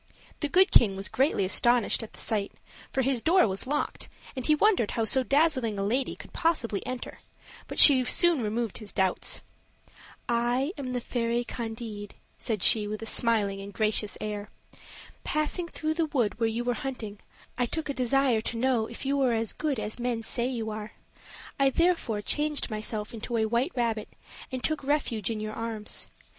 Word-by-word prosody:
The 295 - -2
Good 375 +5 +5
King 200 -5 +5
was 195 +1 -4
greatly 250 -4 +1
astonished 240 +4 +3
at 225 - -9
the - - -11
sight; 205 -3 -1 0.4
for 265 - 0
his 260 -2 +1
door 345 -1 +4
was 195 +4 -4
locked, 295 +2 -2 0.3
and 260 - -4
he 305 +4 +4
wondered 375 - +3
how 225 - +1
so 265 +4 +2
dazzling 260 -6 +1
a 195 - -1
lady 250 +7 0
could - - -13
possibly 275 - 0
enter; 255 -1 -6 0.5
but - - -7
she 265 -4 +10
soon 345 +1 +3
removed 225 0 -2
his 215 -3 -5
doubts. 190 -2 -1 0.8
"I 240 +4 +1
am 260 -3 -5
the 245 - -2
fairy 235 0 -1
Candide," 225 -3 -6 0.2
said 220 -6 -1
she, 210 -2 +6
with 215 +1 -5
a - - -5
smiling 210 -4 +2
and 200 +1 -8
gracious 215 -2 0
air. 210 -1 -5 0.7
"Passing 305 +3 -1
through 315 -1 -2
the 325 0 0
wood 240 -7 -1
where 225 -1 +2
you 230 +2 -2
were 245 0 0
hunting, 235 -6 -6 0.4
I 245 0 0
took 320 +5 -3
a 280 - -2
desire 255 -2 +2
to 230 - -4
know 240 -2 +1
if 235 - -9
you 280 +1 +1
were 260 -3 +2
as 225 -1 -1
good 295 -6 -2
as 215 +2 -5
men 240 -2 -2
say 240 +2 -1
you 230 -4 -3
are 215 0 -7 0.7
I 275 0 +5
therefore 270 -10 +1
changed 295 +1 0
myself 215 0 -4
into 230 +1 -4
a 220 - +2
white 235 +9 0
rabbit 230 -3 -1 0.4
and 255 -1 -4
took 310 -2 -1
refuge 265 -8 -1
in 225 -2 -3
your 215 0 -4
arms. 225 -2 -4
235 Hz, 185 wpm, -27 LUFS, 215-270 Hz, 0.8 s, she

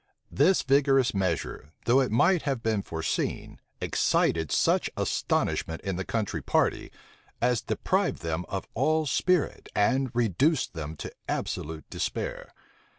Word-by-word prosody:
This 190 - +3
vigorous 135 -2 +3
measure, 95 -6 -2
though 125 +3 +5
it 130 - +2
might 170 - +3
have 135 -5 -2
been 110 -2 +1
foreseen, 80 -3 -3 0.2
excited 80 -2 +1
such - - +2
astonishment 80 0 0
in 95 -2 -2
the 95 - -2
country 110 0 -2
party, - - 0 0.5
as 120 -1 +2
deprived - - -1
them 80 +1 -2
of 95 -1 -4
all 155 +6 +2
spirit, 180 +4 0
and 130 +6 +2
reduced 125 - +2
them 80 -2 -5
to - - -7 0.2
absolute 80 +1 -3
despair. - - -3
115 Hz, 130 wpm, -27 LUFS, 90-135 Hz, 0.5 s, though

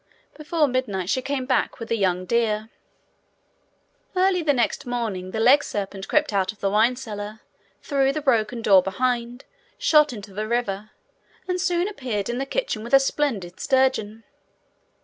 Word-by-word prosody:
Before 305 0 0
midnight 205 -8 -2
she 260 - +1
came 270 0 -2
back 260 0 0
with 230 -1 -7
a - - +3
young 185 -3 0
deer. 220 0 0 1.4
Early 370 -1 +3
the 310 -3 +2
next 245 -2 0
morning 220 -7 -3
the 220 - -4
legserpent 205 -6 +2
crept 300 -6 +1
out 190 -1 +1
of 215 - -20
the 195 - 0
wine 220 +4 +3
cellar, 215 -3 -7 0.4
through 275 -2 +2
the 310 - -3
broken 235 -4 +1
door 195 -3 +6
behind, 240 +5 -2 0.3
shot 300 -2 +4
into 205 -4 -9
the 215 +2 -3
river, 215 -3 -2 0.6
and 365 -1 -1
soon 355 0 +1
appeared 245 - -3
in 240 +1 -2
the 275 - -3
kitchen 380 - -2
with 235 +4 +3
a - - +8
splendid 250 -10 -2
sturgeon. 260 -5 +1
235 Hz, 160 wpm, -24 LUFS, 205-275 Hz, 1.4 s, a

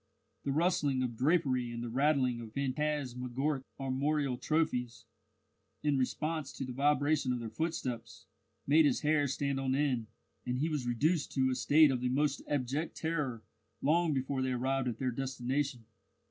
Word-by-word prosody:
The 140 - 0
rustling 145 -4 +2
of 120 -2 -3
drapery 130 -3 +2
and 120 0 -5
the - - -3
rattling 130 -2 +2
of 110 -2 -9
phantasmagoric 135 -1 -1
armorial 135 +1 0
trophies, 125 -5 -1 0.8
in 150 -1 +2
response 150 +3 -1
to 135 - -4
the 125 - -6
vibration 145 0 +2
of 125 - -1
their 115 -2 -6
footsteps, 125 -9 -4 0.4
made 155 +3 +5
his 135 - +1
hair 150 -1 +2
stand 140 0 -1
on 130 -1 0
end, 130 -6 0 0.4
and 125 0 -2
he 155 +5 0
was 145 -6 -2
reduced 150 +7 +1
to 130 -1 +2
a - - +1
state 150 +2 +5
of 125 -2 -1
the 125 - 0
most 145 +2 +1
abject 145 +3 -2
terror 150 -9 -2 0.4
long 165 +3 +2
before 135 -1 -1
they 130 0 0
arrived 130 +1 0
at 120 -3 -2
their 130 0 -1
destination. 130 0 -2
135 Hz, 160 wpm, -32 LUFS, 125-150 Hz, 0.8 s, made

